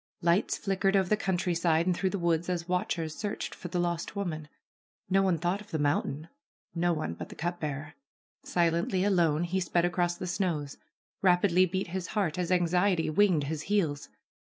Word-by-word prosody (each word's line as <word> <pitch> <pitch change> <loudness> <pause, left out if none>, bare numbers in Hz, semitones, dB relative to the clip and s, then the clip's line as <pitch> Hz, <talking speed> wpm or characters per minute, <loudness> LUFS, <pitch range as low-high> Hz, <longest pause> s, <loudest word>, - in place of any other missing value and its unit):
Lights 170 +4 +2
flickered 195 0 +1
over 190 -1 +2
the 215 - +4
country 190 -4 -1
side 165 -1 +2
and 180 -1 +2
through 190 +2 0
the 200 - -2
woods 170 -1 0
as 175 -2 -2
watchers 175 -3 -1
searched 210 -1 -4
for - - -8
the 180 +1 -3
lost 170 +1 -2
woman. 160 -6 -3 0.6
No 195 +1 +5
one 185 -3 +2
thought 175 +5 -1
of 210 - -14
the 160 - -2
mountain, 145 +1 0 0.5
no 175 +1 +1
one 155 - -2
but - - -8
the - - -10
cup 175 +2 -3
bearer. 145 0 -4 0.5
Silently, 170 +2 +1
alone, 170 -5 +2
he 180 +2 -1
sped 175 -1 +1
across 175 0 0
the - - -5
snows. 175 -6 -2 0.4
Rapidly 185 0 +4
beat 185 +1 -3
his 180 0 -3
heart 180 -5 0
as 180 0 -1
anxiety 180 -1 +2
winged 180 -3 +3
his 150 +1 -3
heels. 165 -9 0
175 Hz, 185 wpm, -29 LUFS, 165-185 Hz, 0.6 s, No